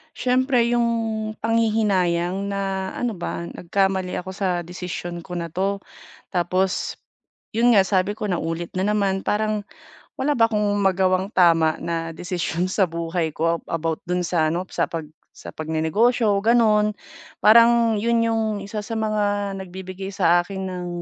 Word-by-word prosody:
Siyempre 255 -1 +2
yung 240 -1 +2 0.5
panghihinayang 200 -5 +1
na 195 -1 -2
ano 245 -2 -1
ba, 170 0 -4
nagkamali 190 0 -1
ako 190 +1 -7
sa 190 0 -2 0.2
desisyon 175 0 -6
ko 180 - -7
na 170 -1 -3
'to 195 +2 -1 0.5
tapos 185 +1 0 0.6
'yon 240 +1 +4
nga, 195 - +7
sabi 190 0 +1
ko 210 - -4
naulit 165 -1 -2
na 190 - +1
naman. 200 -2 +1
Parang 215 0 0 0.6
wala 290 +3 +2
ba 230 -1 +4
akong 210 -2 +1
magawang 190 0 +2
tama 165 -3 +4
na 165 -1 -3
desisyon 175 0 -2
sa 190 -4 +2
buhay 165 -1 -2
ko 165 +1 +1
a - - -4
about 165 -1 -2
don 180 0 0
sa 170 -2 +1
ano, 180 +2 -2
sa - - 0
pag 165 -2 -4 0.3
sa - - -10
pagnenegosyo, 200 +9 +1
gano'n. 215 -2 +4 0.5
Parang 230 0 +6
'yon 230 0 +2
yung 225 -1 +1 0.2
isa 210 +2 -5
sa 225 +2 -5
mga 205 -2 0
nagbibigay 190 +1 -7
sa 175 -2 +4
akin 190 +1 -6
ng, 180 -1 -5
190 Hz, 150 wpm, -23 LUFS, 175-215 Hz, 0.6 s, nga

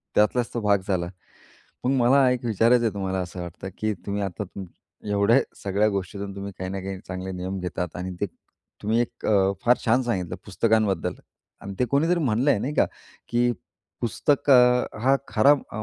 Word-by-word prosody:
त्यातलाच 115 +3 +3
तो 120 - -1
भाग 100 -2 +3
झाला. 90 -3 0 0.8
मग 125 - +2
मला 130 +2 +5
एक 125 -1 -1
विचारायचं 115 +2 +3
आहे 110 - 0
तुम्हाला, 95 -1 -2
असं 90 0 -6
वाटतं 85 +2 -7
की 110 0 0
तुम्ही 100 0 -2
आता 100 +1 -3
तुम 95 0 -8 0.5
एवढ्या 105 +5 +4 0.2
सगळ्या 100 +2 +2
गोष्टीतून 100 0 -4
तुम्ही 100 0 -6
काही 95 0 -4
ना 95 0 -4
काही 95 0 -5
चांगले 95 0 -5
नियम 95 +1 -4
घेतात 90 0 -3
आणि 90 +1 -4
ते 100 - +1 0.6
तुम्ही 110 +3 +1
एक 120 - -4
अ, 100 -2 +3
फार 125 +1 +5
छान 120 +3 +3
सांगितलं 95 -8 -2
पुस्तकांबद्दल 105 -3 +1 0.5
अन् 100 0 -6
ते - - +4
कोणीतरी 165 +5 +2
म्हणलं 130 0 +2
आहे, 120 - +3
नाही 145 +6 -3
का, - - +4 0.4
की 120 +1 +2 0.5
पुस्तक 140 +5 +1
अ, 125 -1 +6 0.2
हा 135 +2 +4
खरा 130 +6 +5 0.2
अ, 110 - -4
105 Hz, 180 wpm, -25 LUFS, 95-120 Hz, 0.8 s, अ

